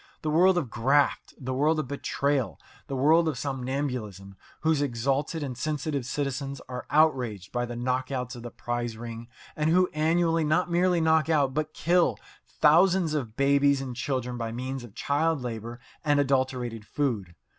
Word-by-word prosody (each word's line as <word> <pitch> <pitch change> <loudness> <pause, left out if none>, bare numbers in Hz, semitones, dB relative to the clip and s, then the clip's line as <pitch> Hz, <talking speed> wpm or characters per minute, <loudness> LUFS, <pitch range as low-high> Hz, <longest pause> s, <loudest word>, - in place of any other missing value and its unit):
The 155 - 0
world 180 +4 +5
of 140 -10 -2
graft! 135 +5 +1
The 130 -1 -4
world 150 +5 +2
of 155 -4 -2
betrayal! 140 - -1 0.3
The 135 - -4
world 160 +5 +4
of 150 -5 -1
somnambulism, 125 -8 -4 0.3
whose 155 -2 +2
exalted 140 +4 -1
and 130 -3 -4
sensitive 145 -1 -2
citizens 140 0 -3
are 125 -1 -6
outraged 125 - +2
by 120 0 -1
the 120 - -6
knockouts 125 +1 -2
of 120 - -9
the 120 - -6
prize 120 -1 -4
ring, 115 0 -7 0.3
and 155 0 +1
who 180 +2 +3
annually 165 +1 +2
not 170 +4 +1
merely 175 0 +3
knock 160 0 +3
out, 140 -4 +2
but 155 +1 -2
kill, 175 +1 +2 0.3
thousands 170 +1 +4
of 120 -8 -3
babies 140 0 +3
and 130 -2 -5
children 125 -1 -3
by 115 -1 -3
means 130 +2 -4
of 115 -3 -12
child 155 +2 0
labour 115 0 -5 0.2
and 145 -2 +3
adulterated 130 -4 0
food. 105 - -2
140 Hz, 165 wpm, -27 LUFS, 120-155 Hz, 0.3 s, world